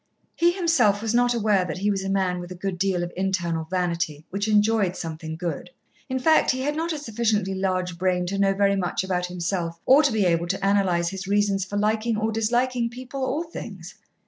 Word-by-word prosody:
He 340 +1 +4
himself 330 - +2
was 225 0 -1
not 245 0 +3
aware 210 -4 +2
that 170 -3 -4
he 205 +2 +1
was 195 -1 -2
a 195 - -3
man 190 -2 0
with 175 0 -8
a - - -6
good 185 0 -4
deal 185 -2 +1
of 175 - -5
internal 175 -4 -1
vanity 170 -4 -2
which 200 +3 -2
enjoyed 210 -3 +2
soothing 160 -1 -6
food. 175 -1 -4 0.4
In 260 - -1
fact, 315 +5 +4
he 260 0 +1
had 295 +3 -1
not 330 +2 -1
a 310 - -2
sufficiently 220 -7 -1
large 185 -2 -2
brain 180 -1 +1
to 195 +2 -3
know 195 -1 +3
very 200 0 +3
much 180 -2 -1
about 180 -1 -1
himself 175 -1 -3
or 275 +3 +7
to 285 -4 +2
be 215 -3 +1
able 170 -1 +1
to 195 +2 -1
analyse 185 -4 +2
his 190 0 -6
reasons 200 -1 +1
for 205 +1 -4
liking 215 +2 +1
or 220 +1 0
disliking 240 +2 0
people 255 +3 -7
or 280 +5 -1
things. - - -8
195 Hz, 215 wpm, -24 LUFS, 180-225 Hz, 0.4 s, or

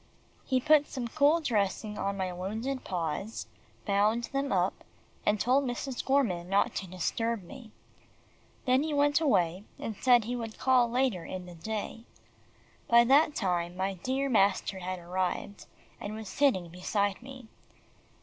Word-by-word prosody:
He 260 -1 +1
put 300 +2 +4
some 250 -3 -4
cool 310 +4 +3
dressing 210 -4 -1
on 195 0 -2
my 185 -1 -2
wounded 220 +9 -4
paws, 180 +3 -3 0.4
bound 210 +3 +2
them 275 0 -1
up, 185 -1 0 0.4
and 210 0 +3
told 260 +6 +3
Mrs. 250 0 -3
Gorman 205 -11 +1
not 195 +1 +2
to 190 - -4
disturb 195 +3 -2
them. 245 -2 -11 0.9
Then 255 +1 +4
he 305 0 -1
went 290 +2 +3
away, 185 - +2
and 220 - -5
said 245 +1 +4
he 240 +3 -3
would 225 -2 -6
call 255 -2 +3
later 245 -7 0
in 185 +2 -6
the 175 - -10
day. 220 +5 -5 0.8
By 235 0 +7
that 290 +5 +4
time, 175 -2 -1
my 190 +1 -1
dear 260 +9 -2
master 200 -4 +2
had 185 0 -4
arrived, 180 +3 -3 0.3
and 205 +1 -5
was 220 -1 -7
sitting 190 -10 +1
beside 200 +4 -1
me. 260 -2 -11
220 Hz, 150 wpm, -29 LUFS, 185-260 Hz, 0.9 s, By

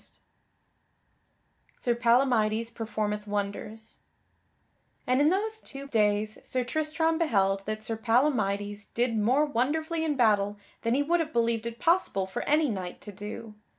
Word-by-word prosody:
[Sidenote: - - -10 1.6
Sir 240 - +1
Palamydes 230 -2 +2
performeth 210 -2 -3
wonders] 205 +2 -4 1.1
And 255 +2 +2
in 295 - +5
those 430 +4 0
two 275 0 -9
days, 210 -2 +1
Sir 255 -1 -1
Tristram 315 +4 0
beheld 195 - +2
that 215 0 -3
Sir 225 0 -3
Palamydes 210 -4 +1
did 235 -1 +1
more 250 +8 +3
wonderfully 310 +5 -1
in 305 -2 0
battle 205 -4 +2 0.2
than 230 +1 +1
he 285 - +2
would 340 +4 +2
have 320 -1 -2
believed 235 -1 +1
it 230 0 -6
possible 330 - +2
for 190 - -4
any 305 +1 +4
knight 185 -6 -4
to 210 - -8
do. 210 +2 -8
230 Hz, 145 wpm, -28 LUFS, 210-285 Hz, 1.6 s, in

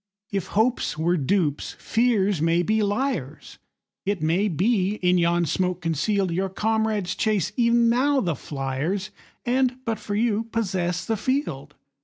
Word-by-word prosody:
If 195 -4 -2
hopes 230 -7 +1
were 170 +3 +1
dupes, 155 -1 0
fears 205 -7 +1
may 165 +2 +2
be 215 +3 +1
liars; 205 - -2 0.4
It 200 -1 -1
may 175 +6 +2
be, 195 +2 +1
in 180 -3 +2
yon 170 0 +2
smoke 180 +3 -1
conceal'd, 175 +4 0
Your 190 +3 -1
comrades 215 -2 0
chase 210 0 0
e'en 235 -1 +3
now 270 +4 +3
the 175 -8 0
fliers, 145 +9 -3 0.3
And, 255 0 +1
but 225 -2 -1
for 205 - -4
you, 225 0 +1
possess 185 -6 -2
the 225 -1 -1
field. 200 - -2
200 Hz, 145 wpm, -24 LUFS, 170-225 Hz, 0.4 s, e'en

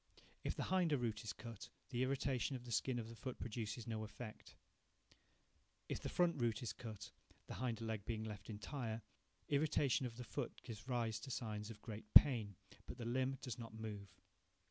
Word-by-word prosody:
If - - 0
the - - 0
hinder 175 -6 +4
root 115 -3 -1
is 110 - -2
cut, 115 -4 -7 0.2
the 120 -1 +1
irritation 130 0 +2
of 125 -1 -6
the 120 - -6
skin 125 +3 +2
of 115 -2 -2
the 115 - -8
foot 130 +2 -4
produces 110 0 -3
no 110 -2 -2
effect. 110 +1 -8 1.3
If - - -1
the - - -3
front 170 -6 +3
root 115 -1 +2
is 120 - -1
cut, 110 -4 -7 0.3
the - - -6
hinder 115 -3 0
being 110 +2 -2
left 105 -1 -6
entire, 115 +1 -3 0.4
irritation 140 -3 +3
of 115 -1 -9
the 125 - -4
foot - - -4
gives 110 +1 -7
rise 115 -4 +1
to 135 - -7
signs 105 -3 -2
of 105 -2 -9
great 110 -2 -6
pain, 115 -8 +9 0.3
but - - -6
the 120 - -4
limb 130 +3 +1
does 125 -3 -3
not 115 -2 -6
move. 105 -2 -4
115 Hz, 185 wpm, -41 LUFS, 110-130 Hz, 1.3 s, pain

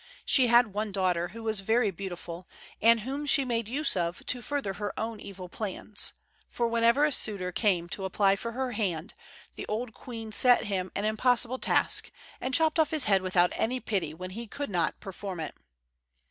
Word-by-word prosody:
She 255 -2 +5
had 235 -3 +4
one 210 0 -2
daughter 180 -3 0
who 225 +5 -10
was 220 -2 +1
very 220 +2 +2
beautiful, 175 -1 -7 0.3
and 230 0 +5
whom 275 +6 -4
she 275 -1 +4
made 230 -3 -1
use 280 +4 +1
of 170 -1 -2
to 250 - -1
further 275 -5 -2
her 205 +2 -5
own 225 0 -4
evil 195 -3 -9
plans; 205 +2 -2 0.4
for, 235 - -1
whenever 235 +4 +3
a 300 - +1
suitor 200 -8 -1
came 180 -4 +1
to 190 +2 -4
apply 195 +1 +2
for 230 +4 -6
her 260 +1 -2
hand, 190 -6 -2 0.4
the - - -7
old 225 +2 -3
queen 225 -3 -8
set 245 +3 +6
him 190 -4 -3
an 200 - -1
impossible 245 +3 +2
task, - - +2 0.3
and 260 - -3
chopped 320 0 +2
off 315 - +4
his 310 -5 +3
head 195 -2 +3
without 180 -1 +2
any 255 +3 -1
pity 195 -10 -2
when 185 +4 -8
he 230 +4 -7
could 285 +2 -5
not 175 -3 0
perform 195 -2 -6
it. 155 - -5
215 Hz, 190 wpm, -28 LUFS, 190-245 Hz, 0.4 s, set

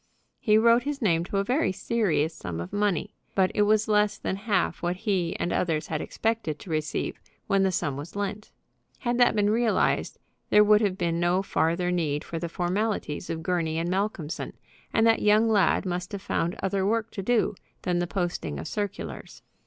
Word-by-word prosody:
He 215 -1 +4
wrote 230 +2 +5
his 285 +2 -3
name 170 -8 +2
to 195 - -3
a 195 - +2
very 255 +2 +1
serious 185 -6 0
sum 90 - -6
of 85 - -6
money, 205 -4 0 0.2
but 190 -1 +3
it - - +1
was 215 +1 +3
less 210 -1 +2
than - - -2
half 200 -2 0
what 175 +1 0
he 185 -4 -1
and 175 - -1
others 155 -3 0
had 150 - -1
expected 220 -9 -2
to 170 - -10
receive 155 -1 -2 0.2
when 195 -1 +2
the 190 -1 +3
sum 145 -6 -1
was 150 +6 -8
lent. 205 +1 -4 0.5
Had 240 0 0
that 245 -2 +5
been 205 0 +3
realized 230 0 +1 0.3
there 210 - +7
would 210 0 +5
have 195 -3 0
been 170 -2 0
no 175 +2 +2
farther 175 0 0
need 155 -5 0
for 165 - -5
the 170 0 -4
formalities 180 -2 -2
of 160 0 -3
Gurney 165 -2 0
& - - -2
Malcolmson, 185 -3 -2 0.4
and 225 - +3
that 225 0 +4
young 210 +2 +4
lad 205 -2 +3
must 180 +1 -3
have 200 - -4
found 170 +2 -1
other 195 0 0
work 220 +2 0
to 195 - -5
do 225 +2 +2 0.3
than 175 -1 0
the 175 - -1
posting 175 - -2
of 80 - -5
circulars. 205 -2 -5
190 Hz, 195 wpm, -27 LUFS, 170-210 Hz, 0.5 s, there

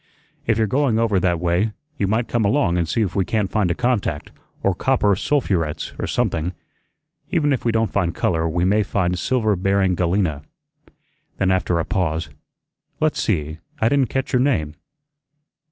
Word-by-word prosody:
"If 115 -1 +2
you're 110 - +3
going 130 +1 +1
over 110 -4 +2
that 85 -2 +1
way, 90 +5 +1 0.3
you 100 - +1
might 110 +4 0
come 120 -2 0
along 100 -4 +2
and 85 -2 0
see 115 - +1
if 95 -4 -3
we 95 - +2
can't 105 0 -1
find 105 -5 +1
a 85 - 0
contact, 120 -11 -1 0.3
or 100 - +3
copper 105 -1 +2
sulphurets, 95 - -1
or - - -2
something. 80 +3 -1 0.8
Even 145 -3 +2
if 130 - -2
we 115 - +3
don't 115 0 0
find 85 -4 0
color 80 -1 0
we 85 +2 0
may 105 +3 +3
find 90 -3 0
silver 110 -3 +1
bearing 95 0 +1
galena." 90 -4 0 1.0
Then, 95 -1 +2
after 90 -2 +1
a 85 - 0
pause, 80 -4 -1 0.7
"Let's 155 -1 +1
see, 80 -5 -1 0.2
I 110 - +3
didn't 135 -3 +2
catch 135 -1 -2
your 125 - +4
name." 95 - +1
100 Hz, 175 wpm, -21 LUFS, 85-115 Hz, 1.0 s, your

